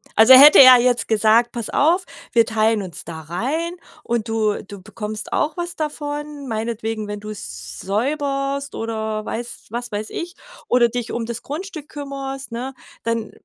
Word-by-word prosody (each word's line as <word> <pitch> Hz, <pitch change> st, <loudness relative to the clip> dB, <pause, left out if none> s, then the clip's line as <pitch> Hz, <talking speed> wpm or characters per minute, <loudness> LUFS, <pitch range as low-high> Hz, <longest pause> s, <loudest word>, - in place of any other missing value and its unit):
Also 220 Hz, +4 st, +8 dB
hätte 285 Hz, +3 st, +9 dB
er 255 Hz, -1 st, +10 dB
jetzt 245 Hz, 0 st, +1 dB
gesagt, 220 Hz, +2 st, +3 dB
pass 235 Hz, -3 st, -4 dB
auf, 340 Hz, +6 st, +3 dB, 0.3 s
wir 230 Hz, -1 st, +5 dB
teilen 220 Hz, -1 st, +1 dB
uns 180 Hz, -3 st, -8 dB
da 160 Hz, -1 st, -8 dB
rein 260 Hz, -, -2 dB, 0.3 s
und 235 Hz, -1 st, -2 dB
du 215 Hz, -2 st, 0 dB
du 200 Hz, -1 st, -9 dB
bekommst 210 Hz, +2 st, -6 dB
auch 305 Hz, +3 st, 0 dB
was 345 Hz, 0 st, -4 dB
davon, 295 Hz, -1 st, -5 dB
meinetwegen, 225 Hz, -1 st, -3 dB
wenn 205 Hz, 0 st, -5 dB
du's 80 Hz, -, -8 dB
säuberst 275 Hz, +5 st, -2 dB
oder 220 Hz, -1 st, -3 dB
weiß 240 Hz, +1 st, -6 dB
was 240 Hz, +1 st, -4 dB
weiß 210 Hz, +1 st, -4 dB
ich 350 Hz, +1 st, -5 dB, 0.3 s
oder 245 Hz, -1 st, +4 dB
dich 240 Hz, 0 st, -4 dB
um 235 Hz, -1 st, -3 dB
das 235 Hz, 0 st, -5 dB
Grundstück 310 Hz, 0 st, -7 dB
kümmerst, 275 Hz, -2 st, -6 dB
ne, 250 Hz, +3 st, -5 dB, 0.3 s
dann 230 Hz, -1 st, -2 dB
235 Hz, 160 wpm, -21 LUFS, 215-280 Hz, 0.3 s, er